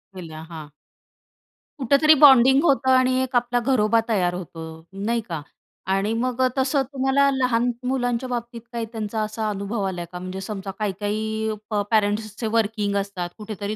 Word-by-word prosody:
Villa 160 -3 -8
हां. 160 -3 -8 1.1
कुठेतरी 280 +4 +5
bonding 270 0 +7
होतं 270 -4 +2
आणि 255 0 +4
एक 260 0 -5
आपला 245 0 +2
घरोबा 230 -3 +2
तयार 180 -5 +1
होतो 170 -2 -7 0.4
नाही 235 +1 +1
का? 165 -3 -3 0.5
आणि 200 +3 0
मग 250 +2 -1 0.2
तसं 270 +1 +2
तुम्हाला 270 +1 +3
लहान 250 -2 +1 0.2
मुलांच्या 245 -1 -1
बाबतीत 235 -1 -4
काही 230 -1 -2
त्यांचा 220 -1 -3
असा 215 0 -2
अनुभव 200 +1 -3
आला 180 -2 -4
का 180 - -6
म्हणजे 185 +1 -6
समजा 195 -1 -5
काही 210 -2 0
काही 220 +1 -2 0.2
प 210 -2 0
पेरेंट्सचे 215 +1 0
वर्किंग 215 -2 0
असतात, 195 -3 -3
कुठेतरी 210 -1 -5
220 Hz, 155 wpm, -23 LUFS, 200-250 Hz, 1.1 s, bonding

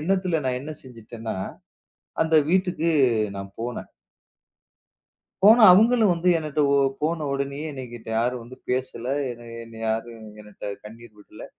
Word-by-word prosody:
எண்ணத்துல 185 0 0
நான் 125 -1 0
என்ன 150 +3 -7
செஞ்சுட்டேன்னா 115 -3 -8 0.9
அந்த 160 0 0
வீட்டுக்கு 180 -2 +1 0.5
நான் 100 0 -8
போனேன். 120 +1 -5 1.6
போன 220 +3 +8
அவங்களும் 220 +1 +5
வந்து 170 +1 -2
என்னட்ட 155 -1 -2 0.4
போனவுடனே 140 -3 -2
என்னகிட்ட 120 -4 -9
யாரும் 125 +1 -1
வந்து 125 +2 -12
பேசல. 125 -2 -3 0.6
என்னை 115 -1 -12
யாரும் 115 0 -4 0.2
என்னட்ட 105 -1 -8
கண்ணீர் 115 0 -13
விடல. 105 - -12
130 Hz, 115 wpm, -24 LUFS, 115-165 Hz, 1.6 s, போன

